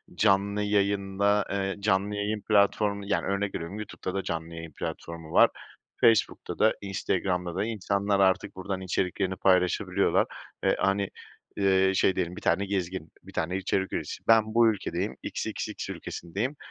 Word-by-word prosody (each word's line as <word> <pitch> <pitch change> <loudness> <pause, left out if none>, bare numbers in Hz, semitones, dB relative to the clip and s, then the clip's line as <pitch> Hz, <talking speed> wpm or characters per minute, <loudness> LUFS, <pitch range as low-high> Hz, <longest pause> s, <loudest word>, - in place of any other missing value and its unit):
canlı 100 +1 +2
yayında, 100 0 +1
eee, 95 0 -1
canlı 100 0 +1
yayın 105 +1 -2
platformu, 100 -1 +2
yani, 100 - 0
örnek 100 +1 -1
veriyorum 85 +5 -5
YouTube'da 95 -3 -5
da 95 0 -2
canlı 80 0 -4
yayın 85 -1 -7
platformu 80 +2 -6
var, - - +6 0.5
Facebook'ta 115 -2 +2
da, 110 - +5
Instagram'da 90 -2 -1
da 100 +3 0
insanlar 100 -2 0
artık 95 -1 +2
buradan 95 0 -4
içeriklerini 95 +1 -1
paylaşabiliyorlar 90 -1 +2 0.4
ve - - +3
hani, 100 0 +1 0.5
ııı, 95 -1 +3
şey 95 - +3
diyelim, 90 -1 -2
bir - - -8
tane 95 +4 +2
gezgin, 95 -4 -3
bir - - -13
tane 90 +4 -1
içerik 95 0 -1
üreticisi - - -4
ben 110 -1 +5
bu 115 0 +6
ülkedeyim, 100 - -3
XXX - - -4
ülkesindeyim 105 - -4
95 Hz, 145 wpm, -28 LUFS, 95-100 Hz, 0.5 s, var